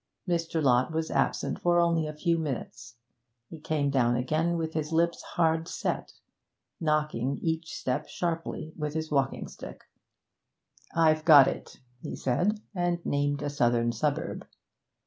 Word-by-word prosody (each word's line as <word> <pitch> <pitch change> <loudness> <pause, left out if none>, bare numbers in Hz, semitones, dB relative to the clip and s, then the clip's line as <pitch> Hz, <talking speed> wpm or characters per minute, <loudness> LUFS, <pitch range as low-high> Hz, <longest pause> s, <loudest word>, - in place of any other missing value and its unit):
Mr. 165 -2 0
Lott 130 +1 +3
was 160 0 -2
absent - - 0
for 175 0 +3
only 165 -2 +2
a 155 - -5
few 170 +1 +1
minutes. 125 -5 -5 0.6
He 165 - -8
came 150 -2 0
down 120 -3 +2
again 155 +7 0
with 160 -1 -3
his 155 0 -2
lips 170 +1 +1
hard 165 -1 0
set, - - -3 0.7
knocking 150 -4 0
each 160 0 -2
step 130 +4 -2
sharply 165 -2 -3
with 150 -1 -4
his 160 -1 -3
walking 140 -3 0
stick. - - -10 1.1
'I've 155 -1 +4
got 145 -5 +8
it,' - - -5 0.2
he - - -5
said, 190 - 0
and 175 -2 -1
named 145 0 0
a 145 - -1
southern 120 -3 +2
suburb. 140 +5 -2
155 Hz, 145 wpm, -28 LUFS, 140-165 Hz, 1.1 s, got